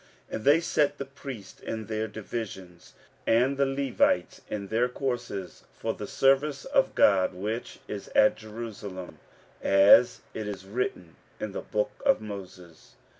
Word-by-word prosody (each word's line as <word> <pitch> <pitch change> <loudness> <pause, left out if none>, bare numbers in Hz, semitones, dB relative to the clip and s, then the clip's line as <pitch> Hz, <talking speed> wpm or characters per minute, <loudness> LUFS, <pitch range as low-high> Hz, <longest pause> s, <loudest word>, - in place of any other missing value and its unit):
15:006:018 - - -4
And 110 - -5
they 145 +3 +7
set 145 -3 +1
the 140 - -4
priests 135 -7 -9
in 110 -1 -4
their 110 0 -2
divisions, 100 -5 -7 0.3
and 125 +5 +4
the 140 0 +2
Levites 140 - +1
in 100 -2 -4
their 120 +3 +2
courses, 120 -7 -4
for - - -2
the - - -7
service 135 +1 +2
of - - +2
God, 95 -2 +4
which 110 +6 -4
is 100 -1 -6
at 105 - +6
Jerusalem; 105 -4 -8 0.4
as 100 +5 +6
it 110 -1 -4
is 95 -2 -6
written 95 -6 -3 0.2
in - - -3
the - - -4
book 105 0 -1
of 275 -1 +4
Moses. 90 -5 -10
110 Hz, 150 wpm, -28 LUFS, 100-135 Hz, 0.4 s, they